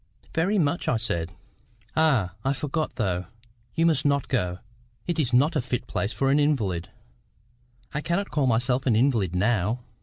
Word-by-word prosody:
"Very 185 +6 +1
much," 165 -1 +1
I 120 - +2
said. 85 -7 -2 0.6
"Ah! 135 - +3
I 135 - +1
forgot, 150 -1 -2
though. 95 -6 -1 0.5
You 165 - +3
must 155 -5 +3
not 140 -1 +1
go; 90 -9 0 0.5
it 170 -2 -1
is 130 -6 +1
not 145 +7 +3
a 145 - +2
fit 125 0 -3
place 100 - -2
for 135 +1 +1
an 145 - +4
invalid." 105 - 0 1.0
"I 150 - -1
cannot 180 +6 -1
call 145 -3 +1
myself 125 +3 +1
an 115 - +4
invalid 110 - +2
now." 105 +3 +1
130 Hz, 170 wpm, -26 LUFS, 110-150 Hz, 1.0 s, an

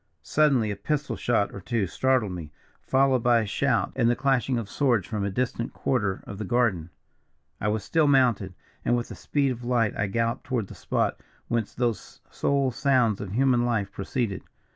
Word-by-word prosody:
"Suddenly 130 - +2
a - - -3
pistol 145 +8 -2
shot 110 -4 0
or 100 - -7
two 115 +1 -1
startled 125 +2 +1
me, 85 -4 -7 0.3
followed 130 -1 +2
by 120 -1 +4
a - - -2
shout 115 -1 0
and 120 -3 +3
the 120 - +3
clashing 130 -1 +1
of 115 -3 -3
swords 120 -6 +1
from 105 -1 -3
a 100 - 0
distant 120 +3 -2
quarter 105 -7 -1
of 100 - -8
the - - -2
garden. 105 -7 +1 0.7
"I 105 - -1
was 105 -1 0
still 160 - +2
mounted, 120 -9 +3 0.3
and 120 - +2
with 120 - -4
the - - -7
speed 140 -2 0
of 120 -1 -6
light 120 -3 +1
I 100 - 0
galloped 115 +4 -1
toward 120 -7 -2
the - - -8
spot - - -1 0.3
whence 115 -3 -1
those 120 -3 -2
sole 140 -2 +1
sounds 125 -5 +2
of 100 -2 -6
human 125 0 +3
life 110 -5 0
proceeded. 100 0 -3
120 Hz, 190 wpm, -26 LUFS, 105-130 Hz, 0.7 s, by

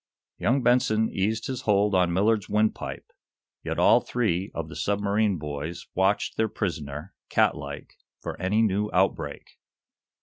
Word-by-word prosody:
Young 130 +2 +1
Benson 110 -3 +3
eased 110 +4 -1
his 130 -2 -4
hold 105 -2 +2
on 90 -2 +3
Millard's 105 +3 +1
wind 105 +1 +2
pipe. - - -7 0.6
Yet - - -3
all - - +5
three 100 -5 -1
of 85 -2 -3
the - - -10
submarine 100 0 +1
boys 75 +2 -5
watched 95 +2 +1
their 110 -1 +1
prisoner, 75 -2 -4 0.2
cat - - +3
like, 70 0 -8 0.2
for - - -5
any 105 +5 +2
new 105 0 +1
outbreak. 95 +1 -1
100 Hz, 145 wpm, -26 LUFS, 90-110 Hz, 0.6 s, all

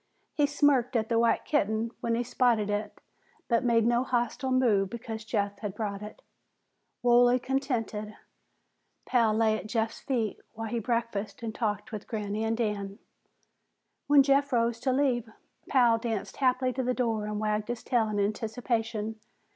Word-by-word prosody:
He 295 -1 +2
smirked 280 -4 +2
at 220 -1 +1
the 230 -1 +2
white 230 0 +2
kitten 225 -5 0
when 235 -2 0
he 240 - 0
spotted 235 -4 +1
it, 205 0 -3 0.5
but 235 -1 +2
made 230 -2 +3
no 240 +1 +3
hostile 245 +1 -1
move 230 -7 +3
because 225 -1 -6
Jeff 205 -2 -2
had 205 -3 -5
brought 205 -2 -3
it. 210 0 -10 0.8
Wholly 245 0 +5
contented, 240 -5 -2 0.9
Pal 235 -3 +3
lay 220 -1 +3
at - - -8
Jeff's 225 0 -1
feet 230 -6 -2
while 225 -1 -5
he 235 - -1
breakfasted 230 -1 -2
and 225 -1 -3
talked 210 +1 -2
with 215 -2 -6
Granny 210 -1 -3
and 225 0 0
Dan. 205 -3 -2 1.1
When 285 -1 +7
Jeff 280 +1 +2
rose 235 -1 +1
to 260 +2 0
leave, 255 -4 +1 0.4
Pal 240 -4 +4
danced 225 -3 -4
happily 255 -1 +2
to 260 - -2
the 250 0 0
door 225 -4 -1
and 210 0 -3
wagged 210 0 -1
his 240 -1 -4
tail 230 -3 +1
in 210 -1 -1
anticipation. 220 +1 -2
230 Hz, 165 wpm, -28 LUFS, 215-245 Hz, 1.1 s, When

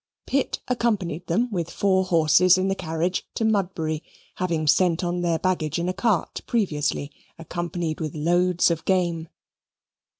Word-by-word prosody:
Pitt 275 0 -1
accompanied 200 -9 -1
them 225 +9 +1
with 170 -4 -2
four 190 0 +1
horses 180 +1 +5
in 185 +1 0
the - - +2
carriage 170 +1 -2
to 225 - 0
Mudbury, 175 -7 0 0.4
having 170 -4 -1
sent 165 +4 +3
on 175 0 -1
their 170 -2 +1
baggage 160 -4 -1
in 170 +1 -1
a 185 - 0
cart 210 -4 0
previously, 150 -9 -1 0.3
accompanied 170 -1 -4
with 155 -2 -4
loads 175 +3 +2
of 165 -1 -2
game. 170 -4 0
175 Hz, 145 wpm, -24 LUFS, 160-185 Hz, 0.4 s, horses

